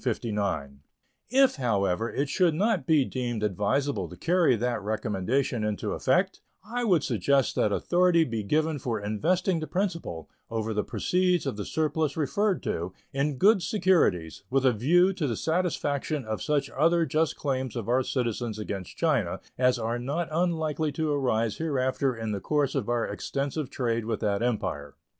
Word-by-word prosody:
If, 265 - +4
however, 110 -3 0
it 140 - -1
should 165 +2 +2
not 195 - +1
be 155 -4 +4
deemed 120 -4 -3
advisable 105 - 0
to 90 - -11
carry 170 - +3
that 120 0 -1
recommendation 110 +4 -1
into 105 -1 -2
effect, - - +1 0.2
I 240 +3 -3
would 180 -10 +3
suggest 135 +3 +1
that 105 - +1
authority 175 - +3
be 115 -7 -3
given 155 +8 0
for 120 -5 -2
investing 165 - 0
the 155 - -4
principal, 170 - -3 0.2
over 110 -1 -2
the 105 0 0
proceeds 180 -2 +1
of 135 - -2
the 105 - -5
surplus 155 -1 -1
referred 195 +6 0
to, 85 +2 -3 0.2
in 140 0 0
good 200 - +5
securities, 175 - +1
with 135 0 +1
a 130 - +5
view 175 - +3
to 165 -6 -2
the 115 -4 -2
satisfaction 155 -4 -1
of 110 0 -3
such 150 -2 0
other 165 +3 +3
just 155 +2 0
claims 130 -4 -2
of 115 -3 -4
our 125 +2 +3
citizens 120 -3 -2
against 100 -4 -6
China 135 - +1 0.2
as 125 0 +3
are 115 +1 -2
not 145 +7 -2
unlikely 160 -2 0
to 155 0 -1
arise 115 -6 0
hereafter 135 -4 0
in 115 -1 -4
the 100 - -2
course 145 -3 0
of - - -2
our 120 -1 +1
extensive 140 0 -3
trade 115 -4 -1
with 110 -1 -2
that 100 -2 0
Empire. 95 -12 -2
135 Hz, 165 wpm, -27 LUFS, 110-160 Hz, 0.2 s, good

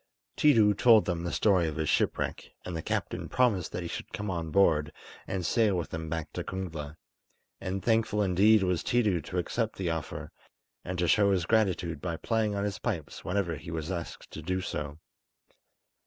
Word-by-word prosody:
Tiidu 110 -9 +5
told 115 0 +6
them 85 -2 -2
the 85 - -2
story 95 -6 +3
of 80 - -3
his 80 -1 -1
shipwreck, - - 0
and 90 - -4
the 80 - -2
captain - - -3
promised 110 -9 +2
that 90 - -4
he - - -4
should - - -6
come 105 -1 -3
on 85 -2 -3
board, 80 -4 +3 0.4
and 95 -2 -2
sail 110 +2 +3
with 85 - -3
them 80 -1 -4
back 80 -2 -4
to - - -3
Kungla; 80 -5 -5 0.6
and 95 0 -4
thankful 110 -2 +2
indeed 100 +3 +5
was 90 -2 +1
Tiidu 105 -8 +2
to 90 - -5
accept 110 +5 -1
the 90 -3 -1
offer, 80 -2 -5 0.5
and 90 0 -4
to 90 0 +1
show 100 +3 +4
his 90 -4 +1
gratitude 95 -7 +1
by 85 -2 -3
playing 110 0 0
on 100 - -1
his 100 -3 -2
pipes - - -4
whenever 90 -4 -1
he 85 - -10
was 80 +1 -4
asked 85 -2 -6
to 80 - -7
do 90 +4 -1
so. 75 -4 -4
90 Hz, 190 wpm, -29 LUFS, 80-105 Hz, 0.6 s, told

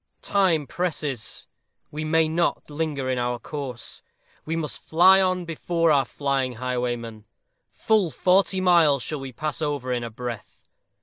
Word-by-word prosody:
_ - - -46
Time 185 -7 +2
presses. 150 -6 -3 0.4
We 150 +1 -4
may 160 +1 +3
not 165 -1 -1
linger 145 -3 -2
in 130 -1 0
our 120 0 -1
course. 130 -2 -7 0.4
We 160 - -2
must 160 -3 -3
fly 190 +4 +5
on 185 -1 0
before 165 0 0
our 140 -2 +3
flying 135 -3 -1
highwayman. 120 -3 -3 0.5
Full 215 -6 +1
forty 190 +3 +2
miles 165 -7 +4
shall 150 - -4
we 135 -1 -7
pass 150 +6 -4
over 145 -4 -2
in 120 -1 -2
a 115 - -4
breath. 120 0 -8
150 Hz, 150 wpm, -24 LUFS, 125-170 Hz, 0.5 s, fly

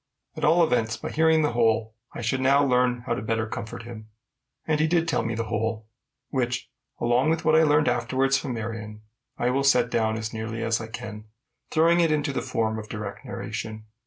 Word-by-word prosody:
At - - -7
all 170 +1 +5
events, 115 -7 +1
by - - -6
hearing 160 0 +3
the 150 - +1
whole, 110 -2 +1 0.2
I - - -7
should 120 +3 0
learn 125 -2 +3
how - - 0
better 110 0 -1
to 110 - -11
comfort 110 +2 -6
him. 115 -2 -9 0.6
And 155 -1 +1
he 155 - +3
did 165 0 +2
tell 165 - +1
me 115 0 -2
the 115 - -1
whole, 110 0 -2 0.4
which, 125 -2 -2 0.3
along 120 +5 +2
with 165 0 0
what 155 0 +5
I 160 - +6
learned 150 -2 +4
afterwards 130 +3 +1
from 130 -2 -2
Marion, 110 -1 -6 0.3
I 125 - +1
will 135 +2 +1
set 125 -3 +3
down 110 -1 +1
as 110 +1 -4
nearly 110 +1 -4
as 115 0 0
I 110 - -6
can, 110 -1 -8 0.4
throwing 170 +2 +4
it 165 -2 +3
into 145 -2 0
the - - -1
form 110 -1 -1
of 105 0 -9
direct 105 -2 -6
narration. 110 0 -6
120 Hz, 205 wpm, -25 LUFS, 110-140 Hz, 0.6 s, I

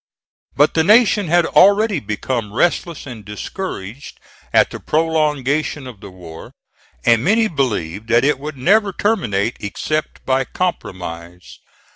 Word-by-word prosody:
But 145 +2 +3
the 160 - +2
Nation 210 0 +4
had 175 +1 +3
already 205 -1 +4
become 105 0 -4
restless 170 +1 0
and 120 -6 -9
discouraged 105 - -7 0.3
at - - +3
the - - -7
prolongation 150 -3 0
of 125 -5 -10
the 100 - -10
war, 85 -3 -12 0.5
and 115 -1 +4
many 220 +5 +3
believed 110 - -2
that 120 +3 +3
it 145 -2 +1
would 150 0 -7
never 200 +8 +2
terminate 120 - -1
except 155 +9 -4
by 135 0 +1
compromise. 90 - -5
135 Hz, 130 wpm, -18 LUFS, 105-175 Hz, 0.5 s, Nation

